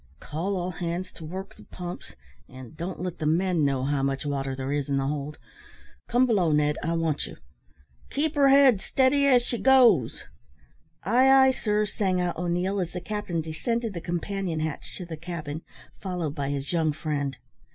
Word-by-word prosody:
"Call 175 +7 -3
all 180 0 -2
hands 175 +2 -4
to 165 - -12
work 190 +5 -6
the - - -16
pumps; 180 -1 -8 0.3
and 130 +2 -11
don't 175 +3 -5
let 180 -2 -4
the 155 - -1
men 170 0 +2
know 135 -2 +1
how 140 0 0
much 135 +1 -1
water 135 -2 -2
there 135 +1 -3
is 145 -1 -2
in 140 - +1
the 135 - 0
hold. 145 +1 -3 0.7
Come 245 +2 +3
below, 195 -9 +2
Ned. 150 0 +2
I 165 - -1
want 165 -3 -1
you. - - -10 0.7
Keep 305 +2 -1
her 280 -2 +4
head 270 -7 +6
steady 275 +4 +3
as 250 -3 +5
she 240 -1 -3
goes." 240 - +4 0.8
"Ay, 245 +8 +4
ay, 265 0 +7
sir," 210 -4 0
sang 195 -3 0
out 175 -1 -1
O'Neil, 180 +3 -1
as 175 -2 -3
the 180 - -3
captain 205 -4 -3
descended 215 +9 -2
the 170 - -5
companion 175 -1 -3
hatch 155 -2 -4
to 180 - -6
the 165 -2 -7
cabin, 160 -2 -6 0.4
followed 180 -6 -3
by 140 -3 -3
his 140 +3 -3
young 160 -3 +2
friend. 145 -3 -3
175 Hz, 185 wpm, -26 LUFS, 150-205 Hz, 0.8 s, ay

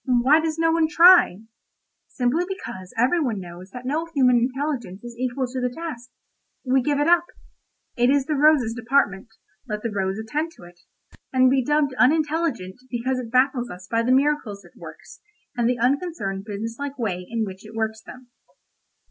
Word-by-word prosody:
Why 255 +5 +4
does 320 0 -2
no 325 0 +2
one 325 -1 +2
try? 340 - +6 0.6
Simply 260 +7 0
because 190 - -7
every 265 +9 +2
one 235 -8 -1
knows 180 +1 -10
that 250 +5 -10
no 310 +5 -1
human 250 -3 +4
intelligence 250 -5 -2
is 240 -1 -9
equal 255 +2 -2
to 255 +1 -5
the 250 - 0
task. 250 -4 -7 0.6
We 260 +1 +3
give 285 +2 0
it 295 - +1
up. 345 0 +4 0.7
It 245 0 +3
is 275 -1 +2
the 305 - -1
rose's 290 -5 +3
department; 230 -5 0 0.4
let 210 -2 -4
the 230 - -2
rose 195 -1 -2
attend 300 +10 -3
to - - -17
it—and 180 +8 -2
be 265 -1 +2
dubbed 295 0 +1
unintelligent 300 - +1
because 255 +2 -2
it 240 -3 -6
baffles 255 0 +1
us 180 +1 -10
by 230 0 +2
the 240 +2 0
miracles 260 -8 +1
it 175 - -19
works, - - -12 0.3
and 240 -1 +1
the 250 - 0
unconcerned 245 - -1
business 220 +2 -5
like 285 0 -5
way 195 -7 -3
in 230 -1 -1
which 190 0 -9
it 215 +1 -12
works 220 0 -2
them. 255 +2 -13
250 Hz, 180 wpm, -23 LUFS, 220-290 Hz, 0.7 s, try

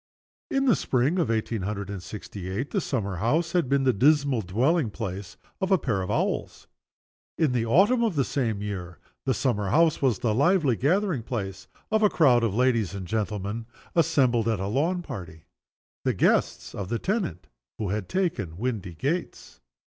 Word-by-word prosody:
In 270 0 +1
the 245 - +5
spring 135 +8 +1
of 170 - +1
eighteen 110 -1 -1
hundred 100 0 -4
and 100 -3 -5
sixty 100 -1 -8
eight 110 +10 -3
the 200 - 0
summer 100 - -2
house 155 - +1
had 170 -8 +1
been 140 0 +2
the 130 -1 +3
dismal 140 +1 +3
dwelling 120 - +1
place 95 -1 -6 0.2
of 190 0 0
a 190 - +6
pair 115 - -1
of 90 - -4
owls. - - -1 0.7
In 155 -5 +2
the 120 -2 0
autumn 205 - +4
of 220 -7 0
the 135 -3 +2
same 115 -7 -1
year 90 -4 -5 0.3
the 130 - +1
summer 105 -7 0
house 160 - +3
was 130 -7 +2
the 110 +1 0
lively 145 - +3
gathering 170 - +1
place 95 -5 -5 0.2
of 220 0 +3
a 210 - +5
crowd 125 -10 +4
of 105 -4 0
ladies 115 -6 +2
and 95 -2 -5
gentlemen, 105 +2 -3 0.3
assembled 135 -9 +3
at 110 -4 +1
a 95 - -2
lawn 160 - 0
party 90 - -8 0.6
the - - +1
guests - - +1
of 95 -2 -5
the 115 - 0
tenant 185 - -2 0.3
who 105 -3 -2
had 105 -1 -3
taken 155 - -1
Windygates. 115 - -3
120 Hz, 175 wpm, -26 LUFS, 100-155 Hz, 0.7 s, a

